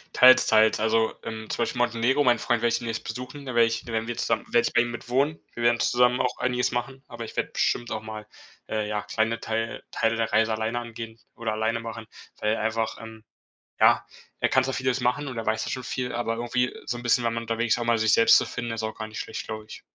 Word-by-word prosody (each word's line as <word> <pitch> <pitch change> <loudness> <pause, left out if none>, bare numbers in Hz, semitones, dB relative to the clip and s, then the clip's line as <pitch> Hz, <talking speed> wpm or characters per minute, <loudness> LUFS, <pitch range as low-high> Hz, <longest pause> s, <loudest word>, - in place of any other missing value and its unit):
Teils, 130 0 +8
teils. 110 0 +4
Also, 110 0 +2
ähm, 110 -1 -6
zum 120 - 0
Beispiel 130 +2 -3
Montenegro. 120 +4 +2
Meinen 120 -3 +4
Freund 120 -2 0
werde 120 - +3
ich - - +2
demnächst 115 -1 -4
besuchen, 125 +3 -7
da 130 - -5
werde 120 0 +5
ich 115 0 -3
da 120 - -8
werden 110 0 -1
wir 120 - -3
zusammen - - -1
da - - -19
werde 120 - +4
ich - - -18
bei 120 - +5
ihm 120 - -2
mit 120 0 -8
wohnen. 140 +5 +1
Wir 120 - -5
werden 120 0 +3
zusammen 125 +1 +3
auch 125 - -1
einiges 125 0 0
machen, 130 +2 -4
aber 115 -1 -6
ich - - -10
werde - - -1
bestimmt 120 - 0
auch 110 - -2
mal, 110 -1 -8 0.4
äh, 110 -1 -1
ja 105 -1 -2
kleine 115 +1 -1
Teil 115 0 -3
Teile 115 0 +1
der 115 -1 -1
Reise 110 0 +3
alleine 110 +2 -1
angehen 115 -1 -8 0.2
oder 115 -1 -3
alleine 110 +2 -1
machen, 115 -1 -7 0.3
weil 105 +1 +1
einfach, 110 0 -1
ähm 110 -1 -11 0.6
ja - - +5 0.3
er - - +3
kann 130 - +4
zwar 135 0 -2
vieles 130 0 0
machen 125 +4 0
und 130 -4 -6
er 115 - -4
weiß 110 0 0
ja - - -4
schon 130 - -3
viel, 125 0 -3
aber 115 -1 -1
irgendwie 125 +1 0
so 120 - -3
'n 120 - -8
bisschen, 120 0 +2
wenn 115 - 0
man 115 - -2
unterwegs 115 0 0
ist - - -3
auch - - -1
mal 115 -1 +2
sich 110 0 +2
selbst 230 0 +7
zu - - 0
finden, 120 -1 -5
ist 115 -1 -3
auch 110 - -3
gar 110 -1 -5
nicht 110 0 -8
schlecht, - - -5
glaub 110 0 -5
ich. 105 - -11
115 Hz, 265 wpm, -26 LUFS, 110-125 Hz, 0.6 s, Teils